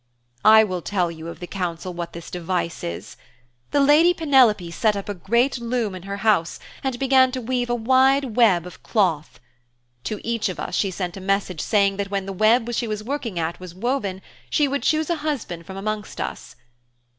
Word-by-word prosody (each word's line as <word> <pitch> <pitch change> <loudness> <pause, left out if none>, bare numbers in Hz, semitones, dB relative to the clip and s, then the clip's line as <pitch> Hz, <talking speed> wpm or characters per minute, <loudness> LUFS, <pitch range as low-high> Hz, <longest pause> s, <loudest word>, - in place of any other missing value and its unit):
'I 220 0 +8
will 185 -4 -3
tell 180 -2 -1
you 160 0 -9
of 170 - -8
the 175 - -6
council 180 -1 -4
what 170 -1 -6
this 170 -1 -9
device 175 -1 -3
is. 85 0 -6 0.5
The 285 - +1
lady 305 +5 +5
Penelope 255 - +3
set 215 +4 +1
up 200 +1 -5
a 205 - -2
great 235 +8 +1
loom 235 -3 -1
in 185 - -7
her 200 - -3
house 195 -7 +2 0.2
and 265 -2 -1
began 260 0 +4
to 260 - -2
weave 245 0 -2
a 240 - +1
wide 260 +1 +3
web 195 -8 +4
of 180 - -11
cloth. 175 -9 0 0.7
To 215 - -3
each 230 -3 0
of 185 - -6
us - - -5
she 195 - +1
sent 180 -1 -4
a - - -8
message 190 -3 -1
saying 200 -2 +2
that 200 -1 -3
when 195 -1 -2
the 195 - -5
web 230 +4 +3
she 235 0 -1
was 215 -1 -4
working 240 -6 -4
at 165 0 -2
was 180 -1 -10
woven, 200 -3 -2 0.3
she 295 - +2
would 280 -1 -2
choose 310 +5 +1
a 340 - 0
husband 260 - -4
from 190 - -8
amongst 210 +1 -4
us. - - -6
210 Hz, 200 wpm, -23 LUFS, 180-250 Hz, 0.7 s, I